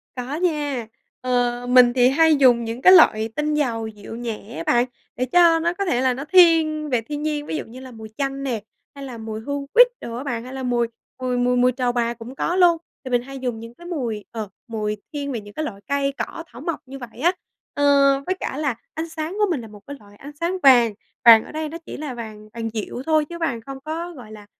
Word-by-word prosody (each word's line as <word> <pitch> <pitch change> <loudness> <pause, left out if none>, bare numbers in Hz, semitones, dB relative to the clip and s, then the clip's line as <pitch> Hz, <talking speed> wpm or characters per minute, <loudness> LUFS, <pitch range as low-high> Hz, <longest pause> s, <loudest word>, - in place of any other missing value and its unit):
Có 255 +3 -4
nha. 295 -9 -1 0.3
Ờ, 245 -1 0
mình 250 -1 +6
thì 250 -1 +5
hay 315 +3 +4
dùng 250 -4 +5
những 230 +3 -5
cái 370 - +8
loại 220 -10 +6
tinh 300 0 0
dầu 235 -7 -1
dịu 210 +1 -9
nhẹ 230 -2 -6
á 165 - -4
bạn, 240 +1 +3 0.3
để 255 - -1
cho 335 +4 +5
nó 340 +2 0
có 395 +1 -3
thể 250 -7 +1
là 260 -1 +2
nó 270 +3 -5
thiên 320 -3 +4
về 245 -4 +1
thiên 295 +6 -6
nhiên, 300 -1 -2
ví - - -4
dụ - - -4
như 240 +3 -11
là 260 -1 -10
mùi 220 -2 -10
chanh 275 -1 -2
nè, 240 -6 -2 0.3
hay 280 - -8
là 250 -3 -8
mùi 220 -1 -6
hương 285 +3 -4
quýt - - +8
đồ 230 - -6
á 255 - -5
bạn, 240 -5 -3
hay 255 +2 -9
là 265 -1 -5
mùi 240 -2 +1 0.3
mùi 250 -1 -1
mùi 250 0 +2
mùi 250 +1 +4
trầu 250 -1 -1
bà 235 -1 0
cũng 240 +3 -10
có 345 - -1
luôn. 350 -2 +5 0.3
Thì 255 - -7
mình 245 -1 +3
hay 270 +1 -9
dùng 245 -3 -3
những 230 +1 -10
cái 345 +5 -12
mùi, 235 - -3
ờ, 220 -3 -5 0.2
mùi 215 -2 -3 0.2
thiên 285 -1 -3
về 235 -4 -3
những 205 0 -13
cái 310 - -3
loại 200 -9 -7
cây 280 0 0
cỏ 330 - -5
thảo 240 +2 -12
mộc 335 -1 -3
như 270 +1 -9
vậy 240 -2 -10
á. 345 - +4 0.4
Ờ, 285 - -1 0.4
với 370 - -1
cả 270 - -4
là 285 -5 -1 0.2
ánh 320 +2 -4
sáng 320 +3 -5
của 420 - +5
mình 280 -8 -1
là 225 - -9
một 210 -1 -13
cái 285 0 -7
loại 205 -1 -18
ánh 280 +7 -11
sáng 350 +3 -1
vàng; 240 -5 +6 0.3
vàng 225 -2 +9
ở - - -11
đây 310 0 -4
nó 330 - -6
chỉ - - -7
là 295 -3 -5
vàng 215 -3 -9
vàng 225 -1 -4
dịu 220 +3 -4
thôi 310 -1 +2
chứ 340 - -6
vàng 265 -9 -2
không 270 +3 -8
có, 330 +3 -4
gọi 245 -8 -12
là, 210 -1 -11
255 Hz, 255 wpm, -22 LUFS, 235-305 Hz, 0.4 s, vàng